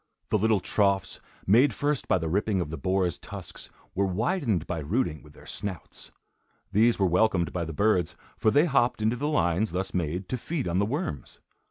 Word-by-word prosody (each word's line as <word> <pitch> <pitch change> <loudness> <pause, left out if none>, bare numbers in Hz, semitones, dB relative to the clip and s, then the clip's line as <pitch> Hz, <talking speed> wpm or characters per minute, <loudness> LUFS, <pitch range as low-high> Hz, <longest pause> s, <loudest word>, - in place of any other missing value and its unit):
The - - +4
little 110 0 +3
troughs, 100 -1 +1 0.3
made 115 +4 +5
first 145 -1 -1
by - - +3
the 80 -2 -3
ripping 100 +3 +1
of 75 -4 -3
the 80 - -4
boar's 90 +1 0
tusks, - - -8 0.2
were 100 +1 +1
widened 110 - 0
by 90 - -3
rooting 80 - -1
with 75 -1 -16
their - - -16
snouts. 95 -5 -7 0.6
These 115 +4 +4
were 95 - +2
welcomed 90 -1 +2
by 85 -2 -2
the 80 - -5
birds, 90 -1 +1 0.2
for 110 - +2
they 145 +8 +4
hopped 125 -7 +2
into 110 +3 +2
the 145 +5 -2
lines 95 - +1
thus 95 +1 -2
made, 90 +1 -2
to 130 - -1
feed 155 +1 -3
on 85 +2 +1
the 100 - +2
worms. 140 - -4
100 Hz, 195 wpm, -27 LUFS, 90-115 Hz, 0.6 s, made